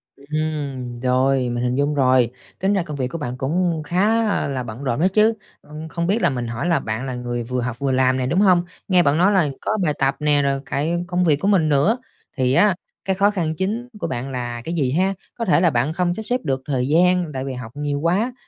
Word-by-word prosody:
Ừm, 140 -4 -4
rồi, 130 0 +2
mình 120 0 -2
hình 125 0 0
dung 145 +2 +1
rồi, 130 -3 +3 0.3
tính 195 +2 +1
ra 195 -3 +1
công 150 -3 -6
việc 130 -2 -1
của 150 - -6
bạn 130 -5 -5
cũng 165 +3 0
khá, 210 +7 +2
a, - - 0
là 135 -2 -3
bận 120 +3 -8
rộn 125 -1 -1
á 175 - +4
chứ, 215 +2 +4 0.3
ưm, 155 +2 -9
không 170 +1 -3
biết 210 +5 +1
là 175 - +4
mình 125 -3 -3
hỏi 120 +8 -3
là 170 - +3
bạn 110 +4 -4
là 130 -2 -4
người 120 -1 -3
vừa 125 +1 -2
học 120 -1 -4
vừa 140 -1 0
làm 130 0 +2
nè, 130 - -1
đúng 170 +8 +1
hông? 180 -4 +5 0.2
Nghe 180 -3 +4
bạn 140 +2 +2
nói 185 +4 +4
là 180 -7 +3
có 215 - -1
bài 150 -4 +1
tập 135 0 +2
nè, 150 -1 +3
rồi 140 -1 0
cả 140 - -2 0.2
công 180 0 0
việc 160 -4 +4
của 195 - -1
mình 185 -7 +3
nữa, 150 - +3 0.4
thì 130 0 +2
á, 200 +6 +4 0.3
cái 190 -1 0
khó 200 +2 +3
khăn 165 -5 -2
chính 215 +8 -2
của 170 - -2
bạn 135 -3 -4
là 120 -2 -4
cái 165 - -3
gì 140 -7 0
ha? 190 +6 +1 0.2
Có 230 - -2
thể 180 -4 +4
là 175 - +5
bạn 135 +3 0
không 175 0 0
sắp 220 - -6
xếp 245 +3 0
được 135 -3 -1
thời 130 -3 -1
gian 175 +1 +3
tại 130 0 -3
vì 135 - -4
học 125 -3 -7
nhiều 145 -1 -2
quá, 190 - +1
150 Hz, 255 wpm, -21 LUFS, 130-180 Hz, 0.4 s, hông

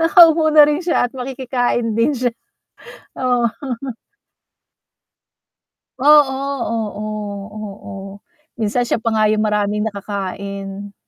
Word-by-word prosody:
nakaupo 330 -1 +6
na 305 -1 +8
rin 300 +2 0
siya 340 -7 +1
at - - -31
makikikain 250 -3 -2
din 260 +5 +2
siya, 245 -1 0 0.8
oo. 245 -2 +1 2.5
Oo, 290 -1 +6 0.4
oo, 210 -1 -5 0.2
o. - - -7 0.7
Minsan 225 +2 0
siya 240 - 0
pa 225 0 -1
nga 215 -1 +3
yung 215 0 +1
maraming 210 0 0
nakakain. 200 -1 -5
230 Hz, 105 wpm, -19 LUFS, 205-260 Hz, 2.5 s, na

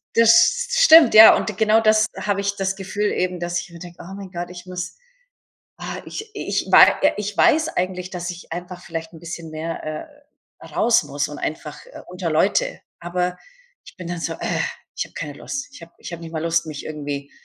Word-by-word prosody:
Das 230 -1 +5
s 480 - +5 0.2
stimmt, 320 - +8
ja 220 +1 +10
und 210 - -3
genau 220 +1 +4
das 215 0 +4
habe 200 -1 -1
ich 200 0 -1
das 195 -1 -2
Gefühl 200 +2 -2
eben, 180 -1 -2
dass 175 0 -2
ich - - -12
immer 170 0 -12
denke, 175 0 -11
oh 180 +3 -10
mein 195 -2 -9
Gott, 175 -1 -5
ich 180 0 -10
muss 180 -1 -6 0.8
ah, - - -6
ich 430 0 -7
ich 415 - -3
war - - +7
ja 295 - +5
ich 210 0 -4
weiß 315 +1 +4
eigentlich, 180 0 -2
dass 180 -1 -5
ich 175 0 -11
einfach 175 +1 -7
vielleicht 165 -1 -6
'n 165 - -12
bisschen 170 -1 -8
mehr, 160 +1 -5
äh, 155 - -5 0.6
raus 235 -1 +2
muss 145 +1 -3
und 150 - -8
einfach 150 -1 -5 0.3
unter 180 -1 -4
Leute. 355 - +1 0.2
Aber 180 +1 -2 0.5
ich - - -15
bin 180 -3 -8
dann 175 -1 -4
so: - - -2
„Äh, - - -2 0.4
ich - - -1
habe - - -18
keine 145 -2 -6
Lust.“ 275 - -6
Ich 175 - -13
habe 165 - -13
ich - - -9
habe 170 - -7
nicht 165 0 -9
mal 160 -1 -3
Lust, 165 0 0
mich 155 -2 -7
irgendwie 145 -2 -6
180 Hz, 215 wpm, -21 LUFS, 165-210 Hz, 0.8 s, ja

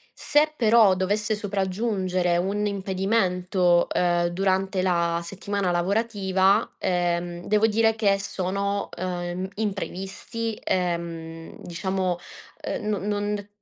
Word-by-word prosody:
Se 300 +1 +2
però 220 -4 +5
dovesse 205 +4 0
sopraggiungere 190 -3 0
un 200 +4 0
impedimento, 190 -3 +1
ehm, 175 -1 +2
durante 190 +1 0
la 170 -2 +1
settimana 195 +1 -2
lavorativa, 195 +1 +2
ehm, 175 -1 -1
devo 215 +1 +4
dire 225 +1 +3
che 200 -3 +2
sono, 200 +1 -2
ehm, 180 0 -3
imprevisti, 205 +2 -4
ehm, 170 -2 -3
diciamo, 185 +1 -2 0.5
ehm, - - -3
no 210 - +1
non 205 0 -2
190 Hz, 100 wpm, -25 LUFS, 180-205 Hz, 0.5 s, però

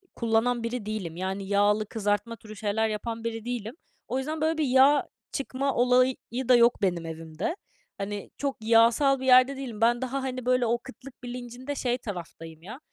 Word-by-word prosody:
kullanan 235 +1 +1
biri 230 -2 -3
değilim. 205 -6 -4
Yani, 190 +2 -4
yağlı 205 +1 +2
kızartma 210 +1 -1
türü 215 0 -12
şeyler 220 +1 0
yapan 225 +2 -4
biri 225 -1 -4
değilim. 240 -1 -4 0.3
O 260 - -2
yüzden, 305 +3 -3
böyle, 320 +1 +1
bir 315 - +1
yağ 270 +2 +5 0.2
çıkma 275 0 -2
olayı 250 +1 +4 0.3
da 250 - +8
yok 235 -1 +4
benim 175 -4 0
evimde. 165 - -4 0.4
Hani, 200 0 -5
çok 280 -1 -2
yağsal 230 +5 +4
bir 260 - -5
yerde 255 +1 +6
değilim. 240 -5 -6
Ben 240 +1 +3
daha, 260 +1 -2
hani, 255 -2 -4
böyle, 250 -1 +3
o 235 +1 +1
kıtlık 265 -1 -13
bilincinde 245 +3 -6
şey 245 -2 0
taraftayım, 165 -7 -8
ya. 220 +8 -9
235 Hz, 175 wpm, -27 LUFS, 210-255 Hz, 0.4 s, da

